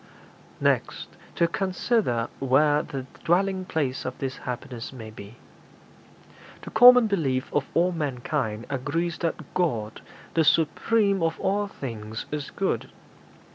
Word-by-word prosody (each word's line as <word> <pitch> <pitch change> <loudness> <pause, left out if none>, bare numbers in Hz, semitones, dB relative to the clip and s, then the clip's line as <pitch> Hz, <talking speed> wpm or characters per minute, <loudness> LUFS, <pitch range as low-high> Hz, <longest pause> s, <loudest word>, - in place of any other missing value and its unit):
'Next - - 0 0.3
to 170 - +3
consider 185 - 0
where 145 +3 +3
the 135 -3 -6 0.2
dwelling 185 +2 +1
place 140 -7 -2
of - - -5
this 130 -1 -4
happiness 120 -1 -5
may 115 -4 -9
be. 105 +1 -11 1.3
The - - -8
common 245 +1 +8
belief 140 -11 -1
of 145 -2 +1
all 175 +2 +3
mankind 130 -7 -2
agrees 150 +5 -2
that 165 -2 -3
God, 115 -12 -1 0.3
the 165 - +3
supreme 195 +6 +2
of 165 0 0
all 205 +1 0
things, 110 - -6
is 150 -2 -4
good. 195 -1 -2
150 Hz, 125 wpm, -26 LUFS, 130-185 Hz, 1.3 s, common